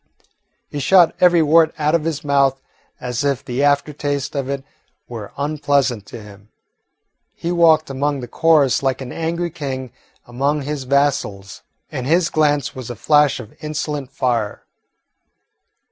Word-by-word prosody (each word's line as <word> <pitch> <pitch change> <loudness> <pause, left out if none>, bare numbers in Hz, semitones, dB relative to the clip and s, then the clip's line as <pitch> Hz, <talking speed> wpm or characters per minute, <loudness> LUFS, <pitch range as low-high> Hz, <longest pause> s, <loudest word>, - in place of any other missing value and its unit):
He 145 - -6
shot 175 +4 +5
every 175 -2 +5
word 160 +1 +4
out 150 0 +1
of 165 -2 +1
his 155 -3 -3
mouth 140 -1 +2 0.4
as 125 +1 -3
if 140 -3 -1
the 125 +2 -2
after 145 +1 +2
taste 145 -1 -3
of 135 -1 -2
it 140 -1 -3 0.4
were 110 -4 -8
unpleasant 140 -6 0
to 115 -3 -9
him. 105 0 -15 0.9
He 170 - -3
walked 165 -2 +4
among 140 +1 -1
the 125 - -7
chorus 155 -4 +3
like 135 -1 -1
an 125 -2 -6
angry 170 +1 -2
king 130 -6 -5 0.3
among 140 +4 -1
his 145 -1 -4
vassals, 125 -8 -1 0.3
and 130 -4 -4
his 170 +2 +2
glance 145 -3 +1
was 130 -3 -8
a 120 - -5
flash 150 +4 +3
of 115 -3 -10
insolent 150 -3 -4
fire. 120 -6 -1
140 Hz, 150 wpm, -19 LUFS, 130-155 Hz, 0.9 s, shot